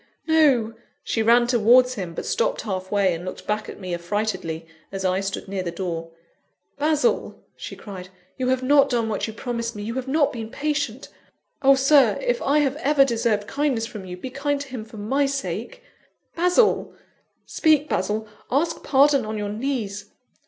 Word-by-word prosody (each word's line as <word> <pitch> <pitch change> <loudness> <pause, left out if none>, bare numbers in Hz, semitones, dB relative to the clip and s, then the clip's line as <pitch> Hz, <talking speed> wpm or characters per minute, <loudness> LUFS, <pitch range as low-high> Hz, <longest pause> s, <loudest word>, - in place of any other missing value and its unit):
no!" 280 -9 +3 0.3
She 225 - -1
ran 235 +2 +5
towards 245 +1 +5
him; 180 -7 -6
but - - -5
stopped - - 0
halfway, 190 -1 0
and 165 +1 -6
looked 185 - -7
back 210 +1 -2
at - - -9
me 185 -2 -5
affrightedly, 175 -2 -3 0.3
as 195 -1 -4
I 185 0 +2
stood 195 0 -4
near 195 0 -3
the 180 - -3
door. 170 -2 -4 0.7
"Basil," 310 +9 +1 0.2
she - - -8
cried, 185 -3 -9 0.3
"you 255 -1 -2
have 255 0 +1
not 280 +1 +5
done 235 -3 0
what 210 0 -2
you 220 - -6
promised 235 -1 -4
me; 205 - -6
you 225 +2 -4
have 260 +1 -4
not 285 +1 +2
been 225 -3 -6
patient. 285 -3 -3 0.5
Oh, 275 0 +6
Sir, 275 +1 +4
if - - -1
I 280 +2 +2
have 280 0 0
ever 285 -2 +4
deserved 230 -4 0
kindness 275 -3 -1
from 215 -4 -8
you, 180 -1 -7
be 255 +8 -7
kind 285 +2 -1
to 280 - -8
him 245 -4 -6
for 220 - -13
my 270 +7 +1
sake! 280 - -4 0.5
Basil! 360 +7 +2 0.5
speak, 305 -2 +2
Basil! 215 -1 -1 0.2
Ask 295 +6 +1
his - - -18
pardon 280 -1 +4
on 215 0 -4
your 205 -1 -3
knees. 210 -3 -3
235 Hz, 180 wpm, -23 LUFS, 205-280 Hz, 0.7 s, Oh